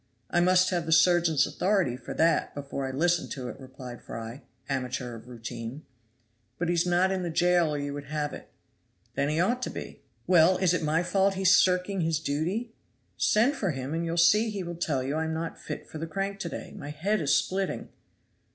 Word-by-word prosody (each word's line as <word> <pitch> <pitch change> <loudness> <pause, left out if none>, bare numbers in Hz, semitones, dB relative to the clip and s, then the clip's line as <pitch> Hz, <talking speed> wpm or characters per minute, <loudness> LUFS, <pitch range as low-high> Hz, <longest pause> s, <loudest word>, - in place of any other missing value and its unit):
"I - - +3
must 185 +1 +4
have 170 -2 -1
the - - -1
surgeon's 170 -2 +5
authority 190 -10 +1
for 125 -1 -8
that, 165 +1 +2
before 140 -1 -4
I - - -3
listen 170 +5 +1
to 125 -3 -5
it," 115 - -9
replied 130 -2 -10
Fry, 115 +4 -7 0.3
amateur 125 -3 -3
of 115 +1 -12
routine. 120 +3 -7 0.7
"But 175 -1 -1
he - - +2
is 175 +1 +1
not 180 +2 +3
in 190 -1 -1
the 175 - -2
jail, 175 0 +3
or 150 - -1
you 145 0 -3
would 145 0 -6
have 150 0 -3
it." - - -10 0.6
"Then 140 +3 0
he 155 +2 0
ought 240 +8 +1
to - - -2
be." - - -8 0.2
"Well, 180 0 +5
is 180 -2 +2
it 180 - 0
my 160 +2 +1
fault 195 +2 +2
he's 190 +1 +5
shirking 180 +1 +2
his 160 -1 +1
duty? 175 +11 -2 0.4
Send 240 +7 +3
for 200 -8 -1
him, 135 -1 -3
and 165 +1 -1
you'll 170 0 -2
see 210 +6 +5
he 200 -3 -4
will 175 0 -5
tell 155 -6 -1
you 135 +2 -2
I 160 - 0
am 160 0 -2
not 165 0 -5
fit - - -6
for 155 - -8
the 165 - -4
crank 195 +4 -3
to 175 - -3
day; - - -7
my 145 - -7
head 175 +7 -1
is 145 - +3
splitting." 190 +1 -1
165 Hz, 215 wpm, -28 LUFS, 140-185 Hz, 0.7 s, surgeon's